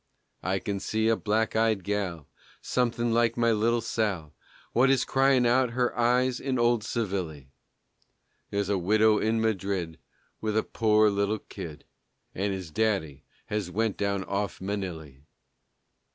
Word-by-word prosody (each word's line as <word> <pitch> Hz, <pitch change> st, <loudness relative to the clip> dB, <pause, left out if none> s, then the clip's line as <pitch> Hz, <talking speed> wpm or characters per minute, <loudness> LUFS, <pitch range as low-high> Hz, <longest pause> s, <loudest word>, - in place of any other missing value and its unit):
I 95 Hz, +1 st, 0 dB
kin 100 Hz, +1 st, -3 dB
see 110 Hz, +3 st, 0 dB
a 115 Hz, -, +4 dB
black 110 Hz, +1 st, 0 dB
eyed 110 Hz, -3 st, +2 dB
gal, 90 Hz, -7 st, -3 dB, 0.3 s
Somethin' 120 Hz, -2 st, 0 dB
like 115 Hz, 0 st, +2 dB
my 115 Hz, -1 st, +3 dB
little 115 Hz, +2 st, +2 dB
Sal, 100 Hz, -9 st, -2 dB, 0.4 s
What 130 Hz, +3 st, +4 dB
is 135 Hz, -2 st, +3 dB
cryin' 135 Hz, -2 st, +3 dB
out 125 Hz, 0 st, +3 dB
her 125 Hz, -1 st, +1 dB
eyes 125 Hz, +1 st, +2 dB
in 130 Hz, -1 st, -1 dB
old 120 Hz, -2 st, +2 dB
Sevilly; 90 Hz, -, -3 dB, 1.0 s
There's 100 Hz, -1 st, -1 dB
a 100 Hz, -2 st, +1 dB
widow 105 Hz, +3 st, +4 dB
in 110 Hz, +1 st, +1 dB
Madrid 95 Hz, -6 st, -1 dB, 0.4 s
With 110 Hz, 0 st, -1 dB
a 110 Hz, -, +2 dB
pore 110 Hz, -1 st, +3 dB
little 100 Hz, +2 st, 0 dB
kid, 80 Hz, -6 st, -9 dB, 0.5 s
And 100 Hz, +2 st, -1 dB
his 95 Hz, -4 st, -5 dB
daddy 95 Hz, -8 st, -1 dB, 0.2 s
has 105 Hz, -4 st, -3 dB
went 110 Hz, +3 st, 0 dB
down 100 Hz, -1 st, -1 dB
off 100 Hz, 0 st, -3 dB
Manilly. 90 Hz, -8 st, -5 dB
105 Hz, 145 wpm, -27 LUFS, 95-115 Hz, 1.0 s, a